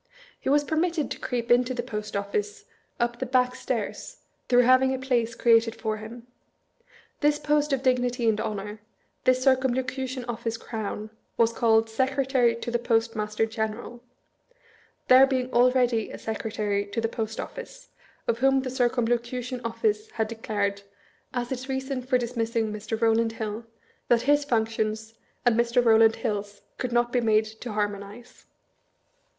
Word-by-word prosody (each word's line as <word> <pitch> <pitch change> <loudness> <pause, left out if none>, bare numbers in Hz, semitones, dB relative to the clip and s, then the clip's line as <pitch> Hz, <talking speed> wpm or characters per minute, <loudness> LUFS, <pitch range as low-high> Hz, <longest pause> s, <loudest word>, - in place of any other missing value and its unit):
He - - -3
was 290 +1 +4
permitted 320 0 0
to - - -4
creep 240 -2 -3
into 250 +1 +3
the 240 - -2
Post 210 -3 -5
Office 415 - -3 0.3
up 240 0 -1
the 260 - -1
back 250 0 +2
stairs, 255 - -4 0.3
through 245 0 +6
having 255 +1 +4
a - - -5
place 240 -3 0
created 230 -1 +3
for 220 -2 -3
him. 230 +2 -10 0.9
This 295 0 +3
post 295 0 +1
of 270 -1 0
dignity 245 -2 +1
and 220 -1 +2
honor, 210 +1 -5 0.4
this 255 +1 +3
Circumlo 260 -1 +3
cution 255 0 -4
Office 230 -1 -3
crown, 215 -1 -5 0.3
was 230 0 +3
called 225 -1 +3
"Secretary 260 0 +1
to 235 +1 -5
the 240 - +1
Post 230 -1 +1
master 215 +1 0
General"; 225 +2 -4 1.1
there 260 +1 +8
being 255 -1 -2
already 245 -2 +3
a - - -7
Secretary 215 -2 -2
to 205 +3 -3
the 225 - +1
Post 225 -1 -4
Office, - - -8 0.4
of 230 - 0
whom 270 +1 +4
the 255 - -4
Circumlocution 245 0 -1
Office 425 - -1
had 220 -1 -1
de - - -4
clared, 200 -3 -2 0.5
as 245 -1 -3
its 260 +1 -4
reason 265 0 -2
for 255 +1 +1
dismissing 230 -2 -1
Mr. 215 +1 -4
Rowland 225 0 +2
Hill, 220 0 -5 0.4
that 235 -1 +3
his 290 +1 +3
functions 220 -2 -1 0.3
and 240 -2 +4
Mr. 235 +1 +2
Eowland 225 -1 +5
Hill's 205 -1 -4 0.2
could 250 - -2
not 240 0 +2
be 250 - +2
made 220 -1 +3
to 220 +1 -8
harmonize. 205 +3 -5
240 Hz, 155 wpm, -26 LUFS, 220-255 Hz, 1.1 s, there